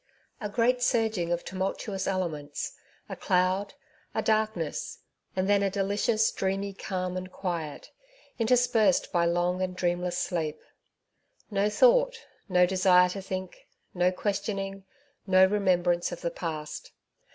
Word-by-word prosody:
A 210 - -4
GREAT 245 +4 +2
surging 220 -8 +1
of 175 0 -1
tumultuous 190 +1 -3
elements^ 160 -7 -3 0.4
a - - -6
cloud, 185 +2 +1 0.4
a - - 0
darkness, 215 -7 -1 0.4
and 185 0 0
then 200 0 +4
a 200 - +2
delicious, 205 +3 +1
dreamy 195 +1 -2
calm 185 -2 -3
and 185 0 -5
quiet, 170 -6 -5 0.5
interspersed 230 -4 +3
by 170 -1 +2
long 175 +2 +1
and 185 -1 -2
dreamless 175 0 -1
sleep! 160 -4 -2 0.9
No 200 +1 +2
thought, - - +4 0.3
no 180 -1 +5
desire 180 -1 +4
to 195 +2 -5
think, 185 -1 -6 0.3
no 180 0 +2
questioning, 195 0 -3 0.4
no 185 0 +6
remembrance 180 -3 +1
of 175 - -7
the 170 - -2
past 160 - -6
185 Hz, 130 wpm, -28 LUFS, 180-205 Hz, 0.9 s, no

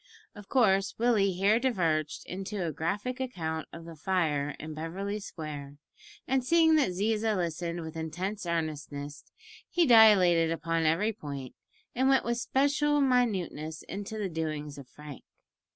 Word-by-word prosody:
Of 205 -2 -13
course 195 -7 +3
Willie 220 -5 +2
here 200 +5 +3
diverged 165 - 0
into 190 +1 -4
a 165 - -2
graphic 200 - -3
account 160 -11 -3
of 165 0 -10
the 165 -1 -9
fire 150 -4 0
in 155 0 -7
Beverly 190 +7 -4
Square, 145 -6 -8 0.5
and, 265 0 +1
seeing 325 +3 +4
that 290 - +3
Ziza 215 +3 0
listened 170 -1 -3
with 160 -1 -8
intense 175 +5 -4
earnestness, 150 -3 -4 0.5
he 345 -1 +3
dilated 195 - +6
upon 165 0 0
every 200 +8 +1
point, 140 - -7 0.4
and 260 +2 +2
went 270 -2 +3
with 235 0 -1
special 285 +3 +2
minuteness 195 - 0
into 205 +3 -6
the 210 -2 -2
doings 155 -4 -4
of 135 - -11
Frank. 150 -2 -11
180 Hz, 145 wpm, -29 LUFS, 160-220 Hz, 0.5 s, dilated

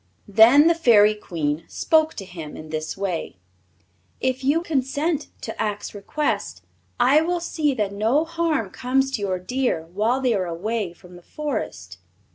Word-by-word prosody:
Then 225 +8 +7
the 335 - +6
Fairy 220 -10 +5
Queen 165 -7 -3
spoke 315 -1 +2
to 195 - -6
him 165 -5 -9
in 155 - -10
this 155 +2 -4
way: 185 - -3 0.8
"If 260 0 -1
you 300 +5 +2
consent 295 +1 -1
to 225 - -5
Ak's 210 -1 -3
request 250 +9 -3 0.4
I 265 +5 +5
will 350 +2 0
see 305 -4 -1
that 205 -3 -1
no 230 +10 +1
harm 325 - -1
comes 265 +2 0
to 230 - -3
your 190 -2 -1
deer 245 -3 -1
while 225 +6 +1
they 255 -3 +1
are 190 -4 -1
away 195 +3 -3
from 175 +1 -15
the - - -14
Forest." 175 - -5
230 Hz, 160 wpm, -23 LUFS, 185-290 Hz, 0.8 s, Then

